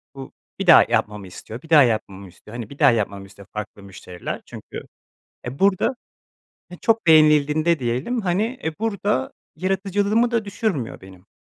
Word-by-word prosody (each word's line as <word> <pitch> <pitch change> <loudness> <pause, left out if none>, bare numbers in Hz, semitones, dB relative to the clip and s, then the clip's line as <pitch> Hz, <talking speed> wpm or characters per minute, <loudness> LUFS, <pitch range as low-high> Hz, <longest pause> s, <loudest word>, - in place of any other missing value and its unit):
bu 135 -1 -9 0.3
bir - - -3
daha - - +9
yapmamı 105 -2 -1
istiyor, 110 +6 -10
bir 160 - -17
daha 155 -3 +7
yapmamı 100 -5 -2
istiyor, 105 +6 -15
hani, 115 -3 -7
bir 140 - -13
daha - - +6
yapmamı 100 -3 -2
istiyor 100 0 -16
farklı 105 -1 -7
müşteriler 95 -2 -8
çünkü, - - -9 0.7
eee, 130 +3 -6
burada 200 +6 +2 0.7
he 180 - -11
çok 225 -5 +1
beğenildiğinde 155 +1 +4
diyelim, 130 - -2
hani, 210 +6 -1
eee, 160 -1 -2
burada 225 +4 -1 0.2
yaratıcılığımı 200 +5 0
da 230 -2 0
düşürmüyor 200 - -3
benim. 95 0 -15
150 Hz, 160 wpm, -22 LUFS, -, 0.7 s, daha